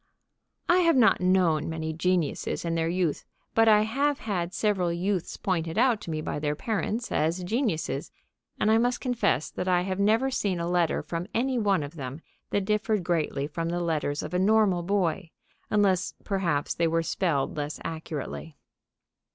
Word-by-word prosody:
I 350 Hz, -, +5 dB
have 335 Hz, -3 st, +4 dB
not 235 Hz, -7 st, +4 dB
known 180 Hz, -5 st, +2 dB
many 160 Hz, -1 st, -3 dB
geniuses 170 Hz, -1 st, -1 dB
in 165 Hz, -, -1 dB
their 165 Hz, 0 st, 0 dB
youth, 175 Hz, -3 st, 0 dB, 0.3 s
but 225 Hz, 0 st, +4 dB
I 210 Hz, -1 st, +6 dB
have 275 Hz, +6 st, 0 dB
had 180 Hz, -5 st, -2 dB
several 190 Hz, -4 st, 0 dB
youths 180 Hz, +1 st, -2 dB
pointed 165 Hz, -2 st, -2 dB
out 240 Hz, -2 st, +3 dB
to -, -, -8 dB
me 155 Hz, -1 st, -2 dB
by 150 Hz, -, -3 dB
their 150 Hz, 0 st, -1 dB
parents 220 Hz, +5 st, -2 dB
as 165 Hz, +4 st, 0 dB
geniuses, 215 Hz, -, -1 dB, 0.5 s
and 215 Hz, -, +3 dB
I 225 Hz, -, +5 dB
must 245 Hz, +1 st, +1 dB
confess 235 Hz, -, 0 dB
that 180 Hz, -, -4 dB
I 180 Hz, -1 st, +3 dB
have 190 Hz, +1 st, -3 dB
never 225 Hz, +6 st, +3 dB
seen 195 Hz, -8 st, -1 dB
a 170 Hz, -, -2 dB
letter 175 Hz, -2 st, +1 dB
from 170 Hz, +1 st, -4 dB
any 255 Hz, +1 st, +1 dB
one 200 Hz, -7 st, +2 dB
of 145 Hz, +3 st, -8 dB
them 135 Hz, +1 st, -6 dB, 0.3 s
that 200 Hz, -1 st, 0 dB
differed 210 Hz, -1 st, 0 dB
greatly 155 Hz, -5 st, 0 dB
from 165 Hz, +3 st, -3 dB
the 175 Hz, +1 st, -1 dB
letters 155 Hz, -4 st, -1 dB
of -, -, -6 dB
a 180 Hz, -, +1 dB
normal 200 Hz, -2 st, +3 dB
boy, 175 Hz, -3 st, 0 dB, 0.4 s
unless 195 Hz, -3 st, +2 dB
perhaps 170 Hz, -8 st, 0 dB
they 170 Hz, -, +1 dB
were 165 Hz, 0 st, +1 dB
spelled 165 Hz, -5 st, 0 dB
less 150 Hz, 0 st, -4 dB
accurately. 160 Hz, -1 st, -6 dB
180 Hz, 175 wpm, -27 LUFS, 160-210 Hz, 0.5 s, I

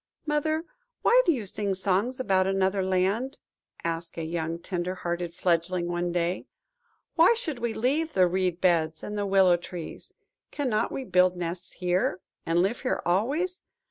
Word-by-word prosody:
"Mother, 310 Hz, +2 st, 0 dB, 0.4 s
why -, -, +6 dB
do -, -, +7 dB
you 245 Hz, -9 st, -2 dB
sing 200 Hz, 0 st, -2 dB
songs 200 Hz, +7 st, 0 dB
about 190 Hz, -6 st, +2 dB
another 195 Hz, 0 st, +1 dB
land?" 195 Hz, +8 st, 0 dB, 0.5 s
asked 165 Hz, 0 st, -3 dB
a 165 Hz, -, -2 dB
young 165 Hz, 0 st, -2 dB
tender 180 Hz, +1 st, -3 dB
hearted 175 Hz, -1 st, -3 dB
fledgling 175 Hz, 0 st, 0 dB
one 175 Hz, 0 st, -1 dB
day. 175 Hz, +1 st, -1 dB, 0.7 s
"Why 350 Hz, +7 st, +6 dB
should 320 Hz, -, -3 dB
we 235 Hz, -1 st, -2 dB
leave 295 Hz, +8 st, 0 dB
the 185 Hz, -1 st, +5 dB
reed 180 Hz, -1 st, 0 dB
beds 160 Hz, -3 st, +2 dB
and 210 Hz, -, -5 dB
the 205 Hz, -1 st, -1 dB
willow 190 Hz, -2 st, +5 dB
trees? 175 Hz, -1 st, -8 dB, 0.4 s
Cannot 250 Hz, -7 st, 0 dB
we 270 Hz, -, -3 dB
all -, -, -14 dB
build 180 Hz, 0 st, +4 dB
nests 175 Hz, +1 st, -4 dB
here, 180 Hz, 0 st, 0 dB, 0.3 s
and 170 Hz, +2 st, +3 dB
live 205 Hz, +6 st, 0 dB
here 255 Hz, -, -1 dB
always? 285 Hz, -, 0 dB
185 Hz, 165 wpm, -27 LUFS, 175-240 Hz, 0.7 s, do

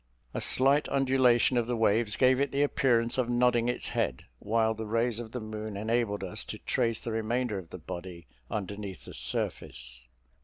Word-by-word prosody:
A -, -, -3 dB
slight 135 Hz, +3 st, +3 dB
undulation 130 Hz, -2 st, +3 dB
of 120 Hz, -1 st, +1 dB
the 120 Hz, -1 st, -1 dB
waves 110 Hz, 0 st, +2 dB
gave 130 Hz, 0 st, +4 dB
it 140 Hz, 0 st, +1 dB
the 140 Hz, +1 st, +2 dB
appearance 120 Hz, -4 st, +2 dB
of 125 Hz, -2 st, +1 dB
nodding 120 Hz, -1 st, +3 dB
its 125 Hz, -, -2 dB
head; 65 Hz, -, -1 dB
while 110 Hz, +1 st, +1 dB
the 110 Hz, 0 st, -6 dB
rays 115 Hz, +1 st, 0 dB
of 115 Hz, -2 st, -7 dB
the 125 Hz, -, -4 dB
moon 110 Hz, -1 st, -6 dB
enabled 110 Hz, -1 st, 0 dB
us -, -, -2 dB
to -, -, -6 dB
trace 115 Hz, -2 st, 0 dB
the 115 Hz, -, -5 dB
remainder 110 Hz, -1 st, -1 dB
of 85 Hz, -3 st, -12 dB
the -, -, -7 dB
body 85 Hz, -1 st, -8 dB, 0.2 s
underneath 100 Hz, -2 st, -5 dB
the -, -, -9 dB
surface. -, -, -2 dB
115 Hz, 185 wpm, -29 LUFS, 105-125 Hz, 0.2 s, gave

